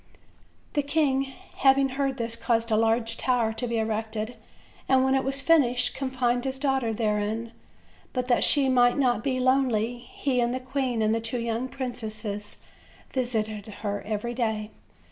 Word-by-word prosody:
The 290 - +2
king 280 -2 +1 0.3
having 270 0 +4
heard 270 0 -1
this 230 -1 -2
caused 230 0 0
a - - +4
large 225 +1 +2
tower 240 -4 +1
to 245 +2 -3
be 235 0 -1
erected, 220 +1 -2 0.5
and 260 -1 +5
when 265 0 +2
it 270 - +2
was 275 +1 -1
finished 255 -6 +3
confined 255 -2 0
his 265 0 -2
daughter 265 -4 0
therein; 215 +1 -1 0.6
but 250 -1 -2
that 245 - +3
she 280 -2 +4
might 245 -1 +4
not 245 -5 +2
be 260 -2 0
lonely, 250 -3 +2
he, 250 +1 -1
the 245 +2 -1
queen 255 -3 -1
and 215 +1 +2
the 230 - 0
two 230 +2 -2
young 230 +2 -2
princes 215 -5 -5 0.5
visited 220 -5 -2
her 205 -1 -4
every 215 +3 -3
day. 220 -3 -2
245 Hz, 160 wpm, -26 LUFS, 225-265 Hz, 0.6 s, and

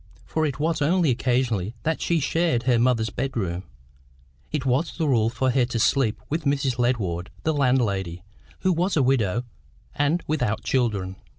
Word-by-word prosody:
For 160 -1 0
it 140 -1 -5
was 160 +1 0
only 165 0 +3
occasionally 120 -4 0
that 160 0 -1
she 170 -1 +1
shared 155 -4 +1
her 125 -2 +3
mother's 115 -3 +2
bedroom; 100 -10 -3 0.9
it 150 -3 -2
was 135 +6 0
the 160 -3 0
rule 115 -5 +3
for 125 +2 0
her 125 -1 +3
to 120 -1 -3
sleep 115 0 +2
with 155 +2 -2
Mrs. 135 -3 0
Ledward, 95 -8 0
the 160 - +1
landlady, 100 - 0 0.4
who 185 -1 +3
was 175 +2 0
a 140 - +4
widow 120 -4 +1 0.5
and 145 +4 +1
without 125 -8 -1
children. 100 -7 0
125 Hz, 165 wpm, -24 LUFS, 110-145 Hz, 0.9 s, a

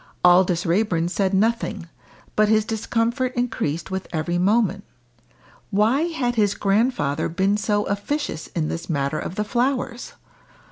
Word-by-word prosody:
Aldous 180 0 +4
Raeburn 170 -2 +1
said 195 -1 0
nothing, 215 -3 0 0.5
but 215 0 +3
his 215 -1 +3
discomfort 230 +3 -1
increased 225 - -2
with 190 0 -3
every 175 +2 -1
moment. 200 0 +2 0.9
Why 225 - +2
had 265 -8 -1
his 210 -4 +2
grandfather 195 - +1
been 190 +4 +1
so 210 0 0
officious 205 - -3
in 160 -3 -2
this 165 +2 -5
matter 140 -1 -1
of 180 - -5
the 210 - 0
flowers? 245 +1 -1
205 Hz, 135 wpm, -23 LUFS, 175-230 Hz, 0.9 s, Aldous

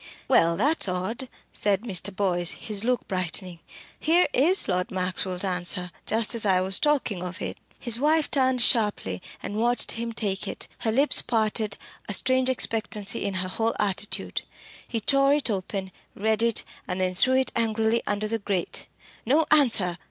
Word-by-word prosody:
"Well, 165 0 +3
that's 285 - +2
odd!" 220 +8 -3 0.2
said 200 -2 0
Mr. 200 -4 -2
Boyce, 175 -3 0
his 210 -2 -2
look 250 +1 -1
brightening. 180 -2 -2 0.4
"Here 340 +3 +3
is 345 +9 +5
Lord 180 -1 -1
Maxwell's 185 0 -2
answer, 180 -1 -2 0.2
just 225 +1 +2
as 230 - +3
I 190 -3 +3
was 185 +1 +3
talking 275 - 0
of 180 0 -6
it." - - -6 0.2
His 235 -2 +5
wife 305 +2 +1
turned 260 -3 +2
sharply 205 - +1 0.2
and 205 - -5
watched 240 +2 +2
him 230 0 -3
take 205 -3 -2
it; - - -5
her 225 - 0
lips 275 +6 +6
parted, 215 -2 -1 0.3
a 205 - +1
strange 260 +2 +3
expectancy 220 -4 +1
in 200 -1 -3
her - - -4
whole 225 +4 -2
attitude. 205 0 -2 0.5
He 230 - -3
tore 275 +4 +3
it 285 -6 -1
open, 190 -1 -4 0.2
read 220 +1 0
it, 230 -1 +2 0.2
and 180 0 -3
then 185 0 0
threw 255 +8 +2
it 260 0 +1
angrily 225 0 0
under 205 +1 -1
the 225 +1 -3
grate. 195 -4 -4 0.4
"No 295 +7 +2
answer. 220 - +3
215 Hz, 165 wpm, -25 LUFS, 185-245 Hz, 0.5 s, lips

